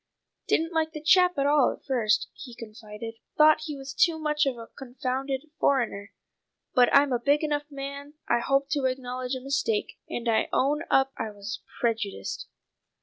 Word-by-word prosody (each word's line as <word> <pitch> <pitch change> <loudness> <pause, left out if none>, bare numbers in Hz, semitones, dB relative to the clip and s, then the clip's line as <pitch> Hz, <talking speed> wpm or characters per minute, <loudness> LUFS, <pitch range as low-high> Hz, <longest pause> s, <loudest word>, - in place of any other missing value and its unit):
"Didn't 330 +2 +1
like 320 -1 0
the 305 - -7
chap 360 0 +5
at 275 - +1
all 285 -2 +4
at - - -11
first," 240 -6 +1
he 245 -4 -10
confided. 225 0 -9 0.2
"Thought 310 0 +6
he 300 -3 -5
was 270 0 -7
too 335 0 +3
much 300 -2 +1
of 260 -3 -1
a 230 - -8
confounded 265 +3 -4
foreigner; 230 -7 +1 0.6
but 245 -2 +5
I'm 280 -1 +5
a 245 - +1
big 285 +5 +2
enough 295 -1 -1
man 280 +1 -7
I 240 - +3
hope 275 +3 +1
to 285 -3 +1
acknowledge 255 0 -2
a 260 - -6
mistake, 270 -6 -1
and 240 0 -4
I 225 -1 +2
own 290 +3 +2
up 270 0 +3
I 225 - -3
was 205 +1 -7 0.2
prejudiced." 220 -4 -2
270 Hz, 175 wpm, -27 LUFS, 240-295 Hz, 0.6 s, Thought